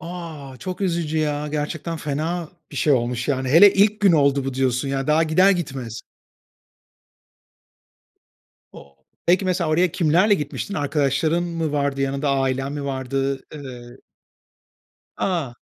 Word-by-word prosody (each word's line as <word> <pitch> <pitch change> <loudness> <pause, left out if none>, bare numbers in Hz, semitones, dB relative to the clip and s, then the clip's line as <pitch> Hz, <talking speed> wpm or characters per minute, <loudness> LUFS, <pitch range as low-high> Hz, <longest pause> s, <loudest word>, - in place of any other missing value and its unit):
A! 160 -6 -8
Çok 185 +4 -6
üzücü 170 -4 -1
ya. 150 -1 -1
Gerçekten 155 +2 -3
fena 160 +3 -3 0.2
bir - - -9
şey 150 - +3
olmuş, 120 0 0
yani. 130 -2 0
Hele 170 +8 +8
ilk 210 +2 +3
gün 200 -3 +5
oldu 140 -3 +3
bu, 135 -1 -3
diyorsun, 130 +1 0
ya, 135 0 -2
daha 155 +2 +3
gider 175 +5 +4
gitmez. 135 - -3 2.7
O 70 -1 -15 0.3
peki, 180 +3 +3
mesela, 180 -3 0
oraya 175 +2 +2
kimlerle 180 +5 +3
gitmiştin? 150 +4 -4
Arkadaşların 145 +2 0
mı 165 -3 -3
vardı 140 -1 -1
yanında? 135 +1 0
Ailen 135 0 0
mi 145 -1 -5
vardı? 135 0 -2
Iıı 125 -4 -10 1.2
A! 160 -10 -2
150 Hz, 135 wpm, -22 LUFS, 135-170 Hz, 2.7 s, Hele